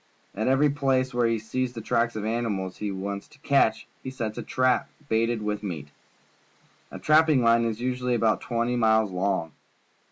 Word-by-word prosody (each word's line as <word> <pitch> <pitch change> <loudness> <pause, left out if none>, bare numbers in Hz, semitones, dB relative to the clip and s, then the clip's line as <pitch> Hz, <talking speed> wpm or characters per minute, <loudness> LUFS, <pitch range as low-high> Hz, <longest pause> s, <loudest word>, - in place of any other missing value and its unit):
At 110 +4 -2
every 135 +3 +3
place 135 -2 0
where 120 -1 +2
he 115 0 +1
sees 125 +3 -3
the 115 - -6
tracks 115 +1 0
of 110 - -4
the 110 - -1
animals 105 -6 -2
he 105 - -3
wants 100 +1 -5
to - - -20
catch, 135 -7 +2 0.2
he - - -6
sets 115 -5 -4
a - - -2
trap 130 0 +1 0.2
baited 115 0 +1
with 105 -1 -2
meat. 80 -8 -6 1.0
A - - -8
trapping 155 -4 +4
line 115 0 +4
is 115 -1 -2
usually 125 0 -1
about 110 -2 +1
twenty 120 0 -1
miles 110 -3 +3
long. 90 -3 -1
115 Hz, 185 wpm, -26 LUFS, 105-130 Hz, 1.0 s, trapping